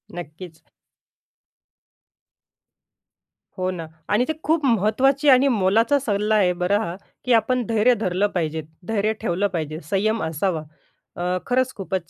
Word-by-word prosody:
नक्कीच. 165 0 -9 3.0
हो 185 0 -1
ना, 165 -3 -6 0.2
आणि 220 +4 +2
ते 315 - 0
खूप 315 -1 +1
महत्त्वाची 260 +5 +2
आणि 265 +1 +6
मोलाचा 225 +5 +3
सल्ला 210 -3 0
आहे 190 -4 +3
बरं 180 +3 +1
हा, 170 -4 -4 0.3
की 250 - +3
आपण 245 +2 +2
धैर्य 230 +2 +3
धरलं 190 0 +1
पाहिजे, 160 -2 -1 0.3
धैर्य 215 -1 0
ठेवलं 200 -1 0
पाहिजे, 155 -2 -3
संयम 215 +2 0
असावा. 160 +1 -1 0.5
अ, 180 +1 -1
खरंच 255 +1 +1
खूपच 190 -3 -4
205 Hz, 130 wpm, -22 LUFS, 180-240 Hz, 3.0 s, आणि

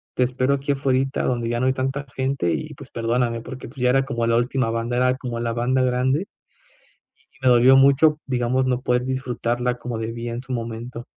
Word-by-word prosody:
te 125 - +2
espero 130 +2 +1
aquí 140 +1 -2
afuerita, 135 0 0
donde 120 -2 -1
ya 120 0 -1
no 130 - +1
hay 130 - +3
tanta 135 +2 -2
gente, 130 -10 0
y - - -4
pues - - -12
perdóname", 115 0 -1
porque 130 +2 -8
pues, 135 0 -13
ya 125 - +3
era 135 +1 +3
como 120 -4 -2
la 115 0 +3
última 125 -1 0
banda, 115 +1 -2
era 125 0 +3
como 120 -3 -5
la 115 -1 -1
banda 125 +2 +1
grande 130 +7 +1 1.1
y - - -24
me - - +3
dolió 125 +2 +6
mucho, 140 +3 +5
digamos, 130 +1 0
no 125 0 0
poder 125 0 +1
disfrutarla 125 -1 -1
como 120 -2 -4
debía 115 +1 -4
en 120 +2 -5
su 130 0 -6
momento. 115 +1 -5
125 Hz, 210 wpm, -22 LUFS, 120-130 Hz, 1.1 s, dolió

